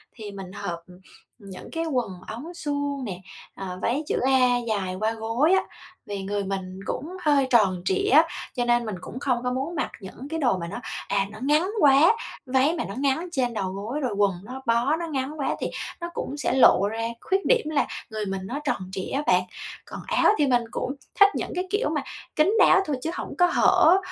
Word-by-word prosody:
thì 215 Hz, -3 st, -8 dB
mình 195 Hz, -2 st, -8 dB
hợp, 185 Hz, -4 st, -5 dB
ừm, 180 Hz, 0 st, -15 dB, 0.4 s
những 195 Hz, -2 st, -10 dB
cái 330 Hz, 0 st, -2 dB
quần 250 Hz, -9 st, -1 dB, 0.2 s
ống 285 Hz, +10 st, -7 dB
suông 285 Hz, -4 st, -2 dB
nè, 185 Hz, -5 st, -5 dB, 0.4 s
à, 185 Hz, -2 st, -6 dB
váy 275 Hz, +6 st, 0 dB
chữ -, -, 0 dB
A 255 Hz, -2 st, +4 dB
dài 195 Hz, -4 st, -1 dB
qua 215 Hz, +1 st, +1 dB
gối 230 Hz, +9 st, +1 dB
á, 380 Hz, -, +4 dB, 0.4 s
vì 200 Hz, -1 st, -5 dB
người 200 Hz, +1 st, -2 dB
mình 190 Hz, -1 st, -4 dB
cũng 345 Hz, -, -4 dB
hơi 285 Hz, -3 st, +3 dB
tròn 195 Hz, -7 st, +3 dB
trịa 190 Hz, -, +1 dB
á, 315 Hz, +4 st, +6 dB, 0.3 s
cho 245 Hz, -2 st, 0 dB
nên 240 Hz, 0 st, +2 dB
mình 215 Hz, -3 st, -3 dB
cũng 245 Hz, -, -7 dB
không 265 Hz, -3 st, +1 dB
có 250 Hz, -, 0 dB
muốn 270 Hz, +7 st, -3 dB
mặc 300 Hz, -, -2 dB
những 210 Hz, +7 st, -9 dB
cái 325 Hz, +1 st, -2 dB
đồ 245 Hz, -10 st, +2 dB
mà 170 Hz, -2 st, -5 dB
nó, -, -, -5 dB, 0.3 s
à, 195 Hz, 0 st, +1 dB
nó -, -, -10 dB
ngắn 300 Hz, +7 st, +2 dB
quá. 290 Hz, +6 st, +6 dB, 0.3 s
Váy 265 Hz, +4 st, +3 dB
mà 335 Hz, -, -2 dB
nó 195 Hz, -, -6 dB
ngắn 280 Hz, +5 st, 0 dB
trên 255 Hz, -7 st, 0 dB
đầu 195 Hz, -4 st, -2 dB
gối, 210 Hz, +9 st, -4 dB
rồi 255 Hz, -7 st, -1 dB
quần 200 Hz, -1 st, +4 dB
nó 255 Hz, +5 st, -8 dB
bó 235 Hz, +5 st, +2 dB
nó 340 Hz, -, -3 dB
ngắn 290 Hz, 0 st, -3 dB
quá 275 Hz, -, 0 dB
thì -, -, -1 dB, 0.3 s
nó 345 Hz, -, -3 dB
cũng 285 Hz, -, -4 dB
sẽ 280 Hz, -, 0 dB
lộ 220 Hz, -6 st, +6 dB
ra 225 Hz, +1 st, -2 dB
khuyết 385 Hz, +1 st, 0 dB
điểm 470 Hz, -10 st, +3 dB
là 300 Hz, -2 st, +1 dB, 0.2 s
người 215 Hz, -2 st, -3 dB
mình 195 Hz, -1 st, -3 dB
nó 255 Hz, +8 st, -4 dB
tròn 190 Hz, -10 st, -2 dB
trịa 190 Hz, -1 st, -5 dB
á 275 Hz, -, +1 dB
bạn. 180 Hz, 0 st, +4 dB, 0.4 s
Còn -, -, -8 dB
áo -, -, +1 dB
thì 290 Hz, -, +3 dB
mình 245 Hz, -2 st, +3 dB
cũng 265 Hz, +2 st, -3 dB, 0.2 s
thích 400 Hz, 0 st, +9 dB
những -, -, -3 dB
cái 365 Hz, +1 st, -2 dB
kiểu 415 Hz, +5 st, 0 dB
mà -, -, -1 dB, 0.3 s
kín 320 Hz, +7 st, +4 dB
đáo -, -, +7 dB
thôi 295 Hz, -, -1 dB
chứ 315 Hz, -, -2 dB
hổng -, -, -5 dB
có 355 Hz, -, +6 dB
hở, 350 Hz, 0 st, +5 dB
255 Hz, 225 wpm, -25 LUFS, 200-300 Hz, 0.4 s, thích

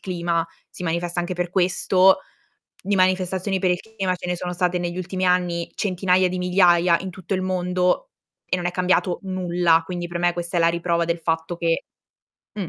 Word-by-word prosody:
clima 170 Hz, -2 st, -1 dB, 0.2 s
si -, -, -9 dB
manifesta 170 Hz, +1 st, -2 dB
anche 175 Hz, +1 st, -3 dB
per 180 Hz, 0 st, -2 dB
questo, 185 Hz, +1 st, +3 dB, 0.6 s
di 200 Hz, +2 st, 0 dB
manifestazioni 185 Hz, +1 st, +1 dB
per 185 Hz, -1 st, +2 dB
il 180 Hz, -, 0 dB
clima 195 Hz, -5 st, -3 dB
ce 180 Hz, -, -8 dB
ne 180 Hz, -, -1 dB
sono 180 Hz, +1 st, -4 dB
state 180 Hz, 0 st, 0 dB
negli 175 Hz, 0 st, -3 dB
ultimi 185 Hz, +1 st, -3 dB
anni 175 Hz, -2 st, 0 dB
centinaia 185 Hz, -1 st, +2 dB
di 185 Hz, -, -4 dB
migliaia, 180 Hz, -2 st, +4 dB
in 190 Hz, -, -5 dB
tutto 185 Hz, +2 st, -8 dB
il 185 Hz, -, 0 dB
mondo 180 Hz, -, 0 dB, 0.4 s
e 185 Hz, -, 0 dB
non 175 Hz, -, -3 dB
è 175 Hz, -, 0 dB
cambiato 180 Hz, 0 st, +1 dB
nulla, 175 Hz, -3 st, +2 dB
quindi 175 Hz, -1 st, -4 dB
per 175 Hz, 0 st, -4 dB
me 175 Hz, 0 st, +2 dB
questa 175 Hz, 0 st, -2 dB
è -, -, +2 dB
la 165 Hz, -, +5 dB
riprova 170 Hz, 0 st, 0 dB
del 170 Hz, 0 st, -1 dB
fatto 165 Hz, +1 st, -2 dB
che, 165 Hz, -1 st, 0 dB, 0.7 s
mh, 200 Hz, -6 st, -4 dB
180 Hz, 195 wpm, -22 LUFS, 175-185 Hz, 0.7 s, la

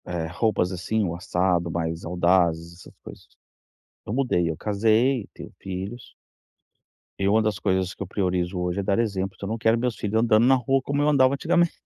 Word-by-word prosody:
Eh, 85 Hz, -2 st, -3 dB
roupas 95 Hz, -2 st, 0 dB
assim 100 Hz, +4 st, -1 dB
ou 85 Hz, -3 st, -2 dB
assado, 90 Hz, -1 st, 0 dB
mais 80 Hz, 0 st, -3 dB
audazes, 85 Hz, -1 st, +1 dB
essas -, -, -14 dB
coisas. -, -, -12 dB, 0.8 s
Eu -, -, -4 dB
mudei, 120 Hz, -11 st, +1 dB
eu 80 Hz, -, -4 dB
casei, 110 Hz, -, +1 dB
tenho -, -, -10 dB
filhos. 95 Hz, +5 st, -7 dB, 1.1 s
E 100 Hz, -, +1 dB
uma 110 Hz, +3 st, +4 dB
das 110 Hz, -2 st, -1 dB
coisas 95 Hz, -1 st, 0 dB
que -, -, -15 dB
eu -, -, -10 dB
priorizo, 90 Hz, -1 st, -1 dB
hoje, 90 Hz, +2 st, -2 dB
é -, -, -2 dB
dar 100 Hz, +3 st, +1 dB
exemplo. 95 Hz, -4 st, -1 dB
Então, 100 Hz, -, -7 dB
não 115 Hz, -, -2 dB
quero 115 Hz, +1 st, +2 dB
meus 120 Hz, -1 st, -1 dB
filhos 110 Hz, +2 st, -1 dB
andando 115 Hz, 0 st, +4 dB
na 135 Hz, +1 st, +5 dB
rua 135 Hz, +2 st, +1 dB
como 140 Hz, +2 st, -2 dB
eu 150 Hz, -, +3 dB
andava 135 Hz, -2 st, +4 dB
antigamente. 170 Hz, +4 st, +2 dB
100 Hz, 190 wpm, -24 LUFS, 90-115 Hz, 1.1 s, na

